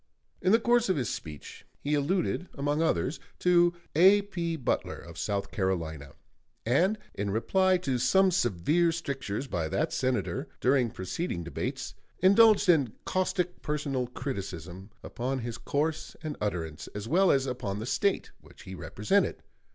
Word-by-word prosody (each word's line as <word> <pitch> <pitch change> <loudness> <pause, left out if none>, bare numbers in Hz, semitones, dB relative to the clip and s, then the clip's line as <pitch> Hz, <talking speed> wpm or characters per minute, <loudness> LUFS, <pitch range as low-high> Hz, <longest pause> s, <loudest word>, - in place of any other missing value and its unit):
In 185 - +3
the 225 - +6
course 240 -1 +3
of 185 - +3
his 125 -2 -1
speech 80 - -8 0.2
he 145 - -2
alluded, 175 +4 0
among 145 +2 0
others, 160 -2 0 0.2
to 175 -1 +4 0.2
A.P. 185 -1 +4
Butler, 135 -6 -1
of 85 0 -10
South 100 -1 -2
Carolina, 80 -7 -2 0.5
and 175 - +3 0.2
in 100 0 -3
reply 185 - +2
to 135 -8 -1
some 190 +8 +4
severe 160 - +2
strictures 140 -8 -3
by 85 - -2
that 155 - -1
Senator 130 0 -1
during 130 -2 +3
preceding 95 - -4
debates, 85 - -4 0.2
indulged 205 +2 +6
in 145 -10 +4
caustic 180 -1 -1
personal 140 -4 -2
criticism 95 - -6
upon 130 +3 -3
his 120 -2 -5
course 155 +2 -2
and 155 -2 -3
utterance, 85 -7 -3
as 105 +1 -5
well 185 +7 +4
as 135 -3 +3
upon 125 -6 -3
the 110 - -4
State 200 +10 0
which - - -17
he 95 - -8
represented. 100 - 0
140 Hz, 145 wpm, -29 LUFS, -, 0.5 s, the